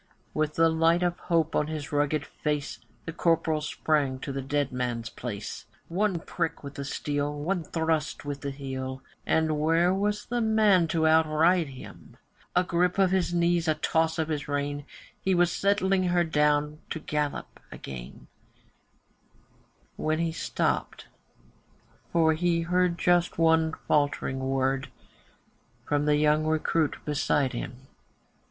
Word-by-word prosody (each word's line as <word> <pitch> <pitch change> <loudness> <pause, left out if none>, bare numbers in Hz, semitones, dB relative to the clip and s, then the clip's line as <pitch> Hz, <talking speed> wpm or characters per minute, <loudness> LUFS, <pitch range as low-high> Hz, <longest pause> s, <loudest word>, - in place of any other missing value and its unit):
With 155 0 -1
the 165 0 +5
light 165 +2 +3
of 175 0 0
hope 165 -2 0
on 150 - +1
his 155 -2 -5
rugged 145 0 0
face, 150 -1 -3 0.3
The 165 - -5
Corporal 165 -2 +1
sprang 150 -3 0
to - - -4
the 135 0 -3
dead 140 +1 -1
man's 120 -2 -3
place, 105 -4 -6 0.2
One 190 +1 0
prick 165 -1 -3
with 140 -1 -7
the 140 - -6
steel, 145 +1 -2
one 170 +4 -1
thrust 160 -3 -1
with 145 -1 -4
the 140 - -3
heel, 130 -1 -5 0.2
And 160 -1 +2
where 165 +4 +3
was 205 +2 -1
the 240 0 -1
man 215 -6 +4
to 160 0 +1
outride 160 +2 +4
him? 130 -2 -12 0.4
A 180 - +4
grip 180 0 +1
of 190 -2 +4
his 185 -2 +1
knees, 170 -1 +2
a 155 - +3
toss 160 +1 +1
of 160 -1 -1
his 150 -2 -3
rein, 145 0 -2 0.4
He 190 -1 +1
was 175 0 +3
settling 195 -1 +2
her 175 -1 +3
down 150 -1 +1
to - - -3
her 155 - -12
gallop 150 -1 -3
again, 60 -2 -9 1.7
When 155 0 0
he 165 0 0
stopped, 160 - -2 1.0
for 160 -2 +4
he 170 +1 +1
heard 180 0 +1
just 175 0 +2
one 160 -1 +3
faltering 145 -3 +1
word 135 0 0 1.0
From 145 0 +1
the 150 0 +4
young 150 +1 +3
recruit 155 0 +1
beside 145 -2 +1
him. 120 +2 -6
155 Hz, 145 wpm, -27 LUFS, 145-170 Hz, 1.7 s, the